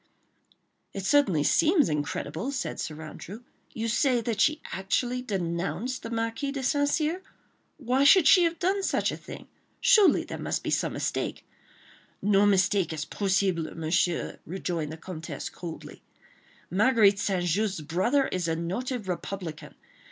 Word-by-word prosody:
"It 195 -1 -4
certainly 200 - +3
seems 320 - +4
incredible," 150 - -3
said 275 - -4
Sir 155 -1 -5
Andrew. 195 +8 -9 0.3
"You 225 0 -3
say 245 +2 +2
that 225 -2 -2
she 305 0 +3
actually 245 +6 -1
denounced 195 +4 -3
the 230 - -6
Marquis 230 +4 -2
de 275 -1 -4
St. 285 +2 +2
Cyr? 320 +5 0 0.6
Why 260 -1 +1
should 310 +2 +7
she 365 - +7
have 335 0 -1
done 380 +4 0
such - - 0
a - - -4
thing? - - -11 0.3
Surely 430 -6 +5
there - - -7
must - - -2
be - - -2
some - - 0
mistake—" - - -3 0.7
"No 205 0 +3
mistake 195 -2 +2
is 155 -2 -4
possible, 190 -5 -1
Monsieur," 165 +1 0
rejoined 170 -3 -4
the 160 - -7
Comtesse, 165 -1 -7
coldly. 170 -2 -9 0.7
"Marguerite 205 0 +4
St. 190 -3 0
Just's 190 +1 0
brother 190 - +1
is 180 -2 -2
a 165 - 0
noted 210 +7 -3
republican. 180 -3 -5
200 Hz, 145 wpm, -27 LUFS, 175-260 Hz, 0.7 s, should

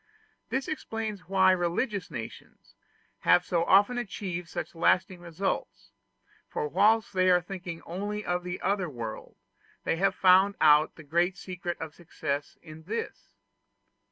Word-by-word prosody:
This 265 0 -1
explains 220 - -4
why 190 -1 +5
religious 185 +3 -1
nations 115 -7 -9 0.5
have 180 - +4
so 170 -2 +1
often 205 +7 +4
achieved 185 -6 -5
such 175 - -5
lasting 180 +2 +2
results: 175 +3 -4 0.6
for 460 -1 -2
whilst 225 - +3
they 185 -1 +4
were 180 - +5
thinking 175 -1 -7
only 205 +4 -4
of 175 0 -1
the 180 0 -5
other 195 -3 0
world, 115 -5 -7 0.5
they 165 - 0
had 195 +3 +2
found 190 +2 +5
out 150 0 +5
the 160 - -12
great 170 +5 +1
secret 180 -2 -5
of 160 -2 -6
success 145 -4 -4
in 155 -1 -11
this. 220 +5 -5
180 Hz, 140 wpm, -28 LUFS, 170-200 Hz, 0.6 s, why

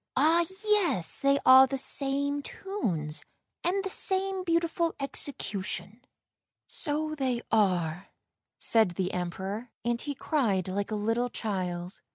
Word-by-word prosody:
Ah, 325 +5 +3 0.2
yes, 365 - +2
they 275 0 +3
are 260 +1 +9
the 270 - -3
same 280 +1 +1
tunes, 185 - -3 0.4
and 385 +3 0
the 385 - -3
same 380 -1 +1
beautiful 335 -1 0
execution." 225 -5 -3 0.3
" - - -64 0.2
So 310 +1 -2
they 260 -5 -1
are," 180 -5 +1 0.5
said 220 -6 +3
the 185 +1 -2
Emperor, 190 +6 -4 0.2
and 235 0 0
he 290 -1 -4
cried 225 - 0
like 200 +2 -2
a 215 - -2
little 225 +4 0
child. 180 -5 -4
250 Hz, 130 wpm, -28 LUFS, 195-310 Hz, 0.5 s, are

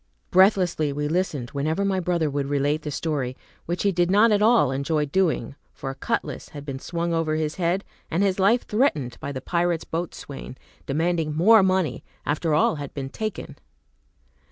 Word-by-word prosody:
Breathlessly 185 -5 +4
we 145 +1 -2
listened 150 -7 -1
whenever 155 +7 -1
my 195 -1 +1
brother 175 -3 0
would 140 -1 -2
relate 145 +2 0
the 150 - -5
story, 140 -4 -2 0.3
which 175 +2 -2
he 200 - +3
did 175 -1 +1
not 210 +4 +5
at 205 -1 +3
all 225 - +4
enjoy 145 +3 0
doing, 155 -6 0 0.2
for 135 - -6
a - - -9
cutlass - - -3
had 145 -1 -9
been 135 -2 -5
swung 170 +3 -2
over 165 -2 0
his 155 0 -2
head, 180 +2 0 0.3
and 175 +5 +1
his 195 -1 +1
life 220 +6 +3
threatened 160 - 0
by 140 - -5
the 130 -2 -5
pirate's 170 +2 0
boatswain, 160 -6 -6 0.3
demanding 160 +1 0
more 215 +7 +6
money, 185 -7 +1 0.2
after 150 +1 0
all 155 0 +3
had 145 -2 -7
been 135 -2 -4
taken. 215 +7 -5
160 Hz, 180 wpm, -24 LUFS, 145-185 Hz, 0.3 s, more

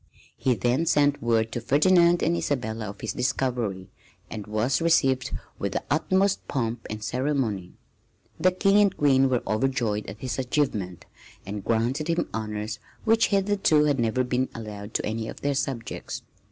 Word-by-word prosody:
He 130 -2 +1
then 125 +8 +1
sent 145 -1 +3
word 115 -1 +1
to 120 - -3
Ferdinand 170 +5 +4
and 170 +2 +2
Isabella 115 -9 -2
of 100 - -10
his 110 - -3
discovery, 120 -8 -1 0.4
and 105 -2 -6
was 110 +8 0
received 135 -6 +2 0.3
with 100 -1 -2
the - - -2
utmost 190 +6 +1
pomp 115 -3 -2
and 110 0 -5
ceremony. 125 -9 -1 0.7
The 185 - +5
King 195 +2 +3
and 200 -2 +2
Queen 135 -2 +4
were 125 -2 0
overjoyed 110 -1 0
at 105 - -7
his 130 +3 -4
achievement 120 - -1 0.4
and 100 0 -5
granted 120 +8 0
him 170 0 0
honors 105 -1 -4 0.2
which 225 0 +4
hitherto 195 -6 +3
had 145 -3 +1
never 120 +2 +1
been 125 +1 0
allowed 105 -2 -8
to - - 0
any 110 +1 -3
of - - -8
their 145 0 0
subjects. 130 -4 -4
125 Hz, 160 wpm, -26 LUFS, 110-150 Hz, 0.7 s, The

